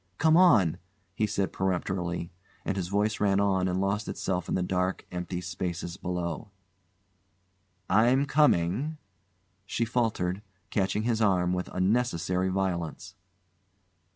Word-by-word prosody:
"Come 160 Hz, +1 st, +4 dB
on!" 125 Hz, -, +5 dB, 0.3 s
he 105 Hz, +3 st, 0 dB
said 100 Hz, -1 st, -1 dB
peremptorily, 90 Hz, -2 st, -2 dB, 0.3 s
and -, -, -1 dB
his 95 Hz, -3 st, -2 dB
voice 105 Hz, +3 st, 0 dB
ran 100 Hz, -1 st, +3 dB
on 95 Hz, -2 st, +2 dB
and 90 Hz, 0 st, 0 dB
lost 100 Hz, +2 st, -1 dB
itself 90 Hz, -2 st, -2 dB
in -, -, 0 dB
the 90 Hz, -, 0 dB
dark, 90 Hz, +1 st, -1 dB
empty 90 Hz, 0 st, -4 dB
spaces 90 Hz, -1 st, -4 dB
below. 90 Hz, 0 st, -4 dB, 1.4 s
"I'm 125 Hz, +6 st, +4 dB
coming," 140 Hz, -, +2 dB, 0.7 s
she 115 Hz, +4 st, -1 dB
faltered, 110 Hz, -6 st, -1 dB, 0.3 s
catching 100 Hz, +1 st, 0 dB
his 115 Hz, -1 st, 0 dB
arm 90 Hz, -4 st, +2 dB
with 90 Hz, 0 st, -2 dB
unnecessary 95 Hz, -3 st, +1 dB
violence. 90 Hz, -2 st, -2 dB
95 Hz, 125 wpm, -28 LUFS, 90-105 Hz, 1.4 s, on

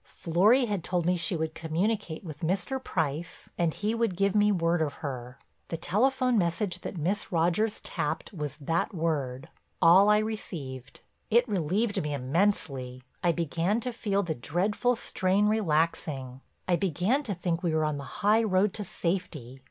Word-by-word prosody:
"Florry 205 Hz, +10 st, +3 dB
had 205 Hz, -6 st, -2 dB
told 175 Hz, -2 st, 0 dB
me 180 Hz, +1 st, +3 dB
she 175 Hz, +1 st, -1 dB
would 160 Hz, -1 st, -2 dB
communicate 170 Hz, +3 st, -2 dB
with 155 Hz, -5 st, -8 dB
Mr. 190 Hz, +10 st, -1 dB
Price 160 Hz, 0 st, -3 dB
and 170 Hz, -2 st, +1 dB
he 210 Hz, +7 st, -2 dB
would 230 Hz, -6 st, 0 dB
give 200 Hz, 0 st, +2 dB
me 210 Hz, 0 st, +4 dB
word 170 Hz, -3 st, +1 dB
of 145 Hz, -3 st, -1 dB
her. 125 Hz, -2 st, -5 dB, 0.3 s
The 165 Hz, -, -4 dB
telephone 250 Hz, -, +2 dB
message 180 Hz, +1 st, -1 dB
that -, -, -6 dB
Miss 180 Hz, +6 st, -2 dB
Rogers 175 Hz, +6 st, +1 dB
tapped -, -, -3 dB
was 150 Hz, -5 st, -4 dB
that 165 Hz, +7 st, -1 dB
word; 140 Hz, -6 st, -2 dB, 0.3 s
all 185 Hz, +5 st, +7 dB
I 210 Hz, -, +6 dB
received. 155 Hz, -, -5 dB, 0.3 s
It 240 Hz, +3 st, +4 dB
relieved 200 Hz, +3 st, 0 dB
me 150 Hz, -1 st, -2 dB
immensely, 135 Hz, -4 st, -1 dB, 0.2 s
I 175 Hz, -, +4 dB
began 170 Hz, +5 st, 0 dB
to 250 Hz, +1 st, -3 dB
feel 200 Hz, -3 st, 0 dB
the 170 Hz, -3 st, -2 dB
dreadful 200 Hz, -, 0 dB
strain 195 Hz, -2 st, +1 dB
relaxing, 155 Hz, -9 st, 0 dB, 0.3 s
I 175 Hz, -2 st, +3 dB
began 195 Hz, -, +1 dB
to 215 Hz, -9 st, -3 dB
think 175 Hz, -1 st, -2 dB
we 170 Hz, -4 st, 0 dB
were 155 Hz, 0 st, +2 dB
on 150 Hz, -2 st, -1 dB
the -, -, -6 dB, 0.2 s
high 215 Hz, +2 st, +5 dB
road 195 Hz, -2 st, +2 dB
to 210 Hz, -, -4 dB
safety. 170 Hz, -9 st, -3 dB
175 Hz, 165 wpm, -28 LUFS, 155-210 Hz, 0.3 s, all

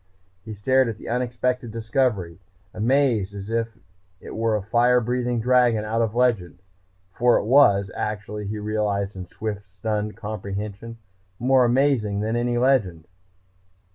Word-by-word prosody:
He 110 Hz, -1 st, -7 dB
stared 130 Hz, +5 st, +2 dB
at 110 Hz, -, -5 dB
the -, -, -11 dB
unexpected 125 Hz, 0 st, -1 dB
discovery, 110 Hz, -6 st, -1 dB, 0.3 s
as 110 Hz, -, -6 dB
amazed 115 Hz, -5 st, +1 dB
as 100 Hz, +2 st, -7 dB
if 115 Hz, -1 st, -2 dB, 0.4 s
it -, -, -9 dB
were 115 Hz, 0 st, +1 dB
a 105 Hz, -, -2 dB
fire 120 Hz, +3 st, +3 dB
breathing 125 Hz, 0 st, -1 dB
dragon 120 Hz, -2 st, +3 dB
out 115 Hz, +2 st, 0 dB
of 115 Hz, -1 st, -1 dB
legend. 115 Hz, -9 st, +1 dB, 0.6 s
For 120 Hz, +3 st, +3 dB
it -, -, -2 dB
was, 100 Hz, -7 st, +4 dB
actually, 105 Hz, -1 st, -4 dB
he 105 Hz, +1 st, -4 dB
realized 105 Hz, -2 st, -2 dB
in 90 Hz, -1 st, -7 dB
swift, 105 Hz, +1 st, -6 dB
stunned 105 Hz, +3 st, -3 dB
comprehension, 105 Hz, +1 st, -6 dB, 0.4 s
more 130 Hz, +2 st, +3 dB
amazing 120 Hz, -5 st, +1 dB
than 110 Hz, +2 st, -1 dB
any 120 Hz, 0 st, 0 dB
legend. 105 Hz, -11 st, +1 dB
110 Hz, 145 wpm, -23 LUFS, 105-125 Hz, 0.6 s, was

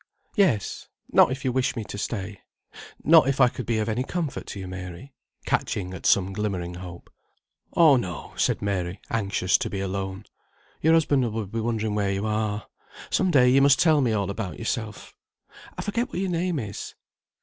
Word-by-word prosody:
"Yes. 180 Hz, -, +1 dB, 0.2 s
Not -, -, +6 dB
if 135 Hz, +2 st, -4 dB
you 130 Hz, -, +2 dB
wish 130 Hz, +1 st, 0 dB
me 115 Hz, -, -3 dB
to 105 Hz, -, -8 dB
stay. 100 Hz, -2 st, -4 dB, 0.6 s
Not 160 Hz, -1 st, +7 dB
if 135 Hz, 0 st, 0 dB
I 125 Hz, -2 st, +6 dB
could 125 Hz, -2 st, -7 dB
be 115 Hz, -1 st, +1 dB
of 110 Hz, 0 st, -1 dB
any 115 Hz, +3 st, 0 dB
comfort 160 Hz, 0 st, -4 dB
to 100 Hz, -, -6 dB
you, 95 Hz, -, -6 dB
Mary;" 95 Hz, +7 st, -8 dB, 0.3 s
catching 95 Hz, -2 st, -1 dB
at 95 Hz, -, -3 dB
some 95 Hz, 0 st, +3 dB
glimmering 95 Hz, -4 st, -3 dB
hope. 90 Hz, -1 st, -10 dB, 0.6 s
"Oh, 155 Hz, -5 st, +7 dB
no," 90 Hz, -9 st, -5 dB
said -, -, 0 dB
Mary, 95 Hz, -2 st, -2 dB
anxious 100 Hz, -5 st, +1 dB
to -, -, -2 dB
be 100 Hz, -, -4 dB
alone. 95 Hz, +1 st, -4 dB, 0.6 s
"Your 160 Hz, +1 st, +4 dB
husband 140 Hz, -7 st, +2 dB
will 110 Hz, -1 st, -3 dB
be 115 Hz, +4 st, -4 dB
wondering 110 Hz, -2 st, -1 dB
where 100 Hz, -2 st, 0 dB
you 100 Hz, +2 st, -2 dB
are. 105 Hz, -1 st, -1 dB, 0.5 s
Some 185 Hz, -, +2 dB
day 125 Hz, -6 st, +5 dB
you 135 Hz, +2 st, +5 dB
must 140 Hz, -1 st, +5 dB
tell 155 Hz, -3 st, +4 dB
me 125 Hz, -4 st, +2 dB
all 100 Hz, -2 st, 0 dB
about 100 Hz, -2 st, -5 dB
yourself. 110 Hz, -2 st, -4 dB, 0.6 s
I -, -, -3 dB
forget 230 Hz, +4 st, -1 dB
what -, -, -6 dB
your 190 Hz, 0 st, -1 dB
name 175 Hz, 0 st, 0 dB
is?" 105 Hz, -6 st, -6 dB
110 Hz, 190 wpm, -25 LUFS, 95-135 Hz, 0.6 s, Not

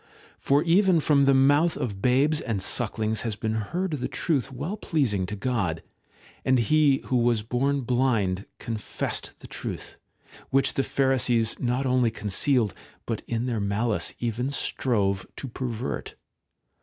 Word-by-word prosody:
For 140 Hz, +2 st, +2 dB
even 180 Hz, +1 st, +4 dB
from 145 Hz, -2 st, +3 dB
the 135 Hz, -, +5 dB
mouth 145 Hz, +5 st, +4 dB
of 100 Hz, -5 st, -3 dB
babes 140 Hz, +6 st, +3 dB
and 110 Hz, -5 st, -2 dB
sucklings 110 Hz, +2 st, -1 dB
has 115 Hz, -3 st, -2 dB
been 110 Hz, +1 st, -2 dB
heard 170 Hz, -, -2 dB
the 145 Hz, -5 st, -2 dB
truth 140 Hz, -5 st, -1 dB
well 145 Hz, +10 st, -4 dB
pleasing 125 Hz, -, 0 dB
to 105 Hz, -, -4 dB
God; 100 Hz, -8 st, -1 dB, 0.6 s
and 130 Hz, 0 st, +3 dB
he 140 Hz, +3 st, +3 dB
who 130 Hz, -, +1 dB
was 120 Hz, -2 st, +2 dB
born 135 Hz, +5 st, 0 dB
blind 115 Hz, -7 st, 0 dB
confessed 110 Hz, -2 st, -4 dB
the -, -, -10 dB
truth, -, -, -6 dB, 0.5 s
which 135 Hz, 0 st, +3 dB
the -, -, +1 dB
Pharisees 125 Hz, -4 st, +1 dB
not 125 Hz, +2 st, 0 dB
only 125 Hz, -2 st, +3 dB
con 105 Hz, -2 st, -6 dB
cealed, 115 Hz, 0 st, +2 dB, 0.3 s
but 115 Hz, -2 st, -3 dB
in 115 Hz, +1 st, -1 dB
their 120 Hz, -3 st, -1 dB
malice 105 Hz, +3 st, 0 dB
even 120 Hz, +2 st, -2 dB
strove 100 Hz, -8 st, 0 dB
to 135 Hz, -, -6 dB
pervert. 125 Hz, 0 st, -4 dB
125 Hz, 150 wpm, -26 LUFS, 110-140 Hz, 0.6 s, the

